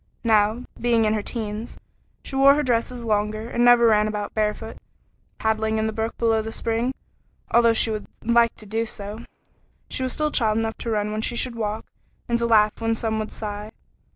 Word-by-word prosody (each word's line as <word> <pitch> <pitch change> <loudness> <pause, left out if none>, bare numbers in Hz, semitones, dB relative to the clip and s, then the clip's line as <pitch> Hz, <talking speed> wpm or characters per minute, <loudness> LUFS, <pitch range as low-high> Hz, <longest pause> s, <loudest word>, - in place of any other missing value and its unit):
Now, 220 +1 +3 0.2
being 235 -2 +2
in 215 - +2
her 215 - 0
teens, 215 0 -5 0.5
she - - -7
wore 275 +1 +6
her 295 - +1
dresses 245 -1 -1
longer 215 0 -1
and 240 0 0
never 245 -1 +6
ran 215 -2 +4
about 210 -1 -4
barefooted, 215 +1 -2 0.6
paddling 220 0 0
in 220 - 0
the 220 - -2
brook 225 +1 -3
below 225 -1 +2
the 220 +1 -6
spring, 230 +3 -1 0.6
although 235 0 +5
she 225 0 +2
would 215 -1 -4 0.2
like 235 0 +3
to 215 - -11
do 225 +2 -2
so; 205 0 -7
still 235 - -12 0.6
she - - -3
was 255 -1 -1 0.2
child 220 -3 +2
enough 225 0 -2
to 235 - -4
run 210 -1 0
when 215 0 -2
she 235 - -2
should 245 +1 0
walk, 215 -1 -3 0.4
and 235 0 +1
to 235 - 0
laugh 215 -1 +3
when 225 0 +1
some 220 -1 -2
would 215 - -4
sigh. 210 0 -6
225 Hz, 200 wpm, -23 LUFS, 215-235 Hz, 0.6 s, wore